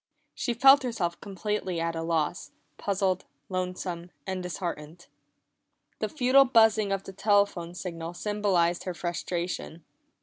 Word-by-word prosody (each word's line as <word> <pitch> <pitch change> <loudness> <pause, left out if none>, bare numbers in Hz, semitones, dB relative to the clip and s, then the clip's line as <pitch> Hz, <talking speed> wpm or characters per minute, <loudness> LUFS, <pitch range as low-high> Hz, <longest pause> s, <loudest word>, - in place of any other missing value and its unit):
She 240 - -2
felt 270 +4 +7
herself 190 -9 -2
completely 195 -2 -3
at 165 0 -1
a 165 - -2
loss, 165 -2 -1 0.3
puzzled, 190 -2 0 0.2
lonesome, 180 -1 -3 0.2
and 190 -1 -3
disheartened. 175 -2 -5 0.9
The - - -1
futile 270 -1 +5
buzzing 220 -5 +4
of 195 0 -1
the 195 - -9
telephone 200 -4 +1
signal 170 -2 -6
symbolized 185 -4 +1
her 180 -2 -3
frustration. 175 -1 -4
185 Hz, 125 wpm, -28 LUFS, 170-205 Hz, 0.9 s, felt